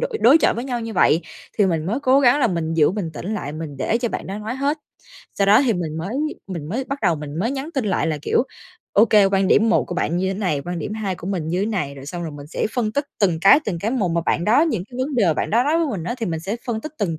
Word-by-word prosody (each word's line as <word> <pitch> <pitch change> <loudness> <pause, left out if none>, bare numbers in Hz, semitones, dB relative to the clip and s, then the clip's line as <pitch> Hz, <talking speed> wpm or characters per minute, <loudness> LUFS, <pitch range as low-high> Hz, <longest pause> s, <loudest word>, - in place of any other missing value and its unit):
đội - - -2
đối 270 +7 +7
chọi - - +2
với 235 - -4
nhau 245 -3 -3
như 225 -1 -5
vậy. 170 -4 +4 0.4
Thì 205 - +5
mình 165 -3 -1
mới 225 +8 -1
cố 270 0 +4
gắng 270 +2 +4
là 245 - +4
mình 165 -5 -2
giữ 155 -1 +4
bình 190 -5 -3
tĩnh 205 +8 -4
lại, 145 -8 -4
mình 155 -2 -6
để 220 - 0
cho 240 0 -1
bạn - - -5
đó 195 +2 -5
nói 215 +3 -4
hết, 280 +4 -1 0.6
sau 200 - +1
đó 205 +2 +6
thì 245 - +3
mình 165 -5 -3
mới 170 +5 -4 0.4
mình 170 -6 -6
mới 250 +9 -2
bắt 275 +1 -4
đầu 170 - +3
mình 150 +1 -7
mới 220 +7 0
nhắn 275 +3 -4
tin 270 -5 0
lại 190 -4 0
là, 155 -2 -1
kiểu, - - +2 0.5
ô 210 - +6
kê, 210 -2 +5
quan 195 -1 +1
điểm 220 +2 +4
một 225 - +3
của 180 - -6
bạn 170 -1 -1
như 190 +1 0
thế 190 - -2
này, 180 -9 0
quan 175 0 -4
điểm 210 +7 -4
hai 205 -4 -2
của 175 - -10
mình 180 -5 -2
như 175 +3 0
thế 200 - 0
này. 180 -11 -2
Rồi 135 0 -11
xong 175 +4 -5
rồi 160 -2 -5
mình 145 0 -10
sẽ 155 - -2
phân 225 -4 0
tích 285 +4 0 0.2
từng 175 -5 +2
cái 195 +10 +7
từng 180 -5 -2
cái 210 +7 -2
một, 220 -9 0
mà 170 0 +1
bạn 170 - +1
đó 225 +8 +4
những 225 - -1
cái 245 - -9
vấn 270 +2 -2
đề 235 - +3
mà 160 - +3
bạn - - -2
đó 235 +4 +3
nói 310 +3 +2
với 335 - +1
mình 195 -10 -4
á 240 - -2
thì 225 - -2
mình 160 -2 -3
sẽ 195 +6 -3
phân 230 -3 -2
tích 310 - -7
từng 165 -6 -1
200 Hz, 320 wpm, -21 LUFS, 170-240 Hz, 0.6 s, đối